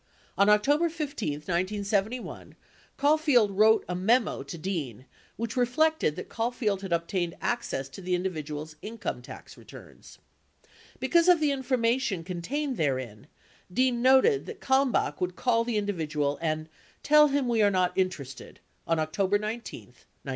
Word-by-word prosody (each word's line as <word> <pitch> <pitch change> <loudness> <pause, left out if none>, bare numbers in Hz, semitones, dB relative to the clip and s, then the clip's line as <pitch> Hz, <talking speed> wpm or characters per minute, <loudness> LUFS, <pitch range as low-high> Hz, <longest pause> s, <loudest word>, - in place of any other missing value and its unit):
On 200 +1 +4
October 290 +11 +3
15, 290 - -3
1971, 200 +8 -2 0.4
Caulfield 285 -7 +3
wrote 215 +3 +4
a 180 - -3
memo 215 - +1
to 140 +5 -8
Dean 150 - -4 0.3
which 230 +2 -4
reflected 255 - +2
that - - -7
Caulfield 225 -4 -2
had 195 -2 -7
obtained 170 +1 -1
access 235 - -2
to 195 - -10
the 180 0 0
individual's 155 -4 -4
income 225 +2 -5
tax - - -12
returns. - - -14 0.8
45 - - -28
Because 340 0 +3
of 355 -2 +6
the 300 -2 +2
information 250 -6 0
con 175 0 -5
tained 280 - -2
therein, 130 -5 -2 0.4
Dean 250 +2 +1
noted 265 - +4
that 445 -3 -8
Kalmbach 265 -1 +1
would 180 0 -1
call 230 -2 +1
the 230 -2 -2
individual 155 -8 -1
and 155 -1 -2 0.4
"tell 300 0 +6
him 280 -2 0
we 230 -2 +2
are 205 - +5
not 185 -2 +1
interested" 155 -9 -3 0.3
on 165 - +1
October 185 +6 +1
19, 215 +3 -5
1971. - - -23
210 Hz, 145 wpm, -27 LUFS, 170-255 Hz, 0.8 s, of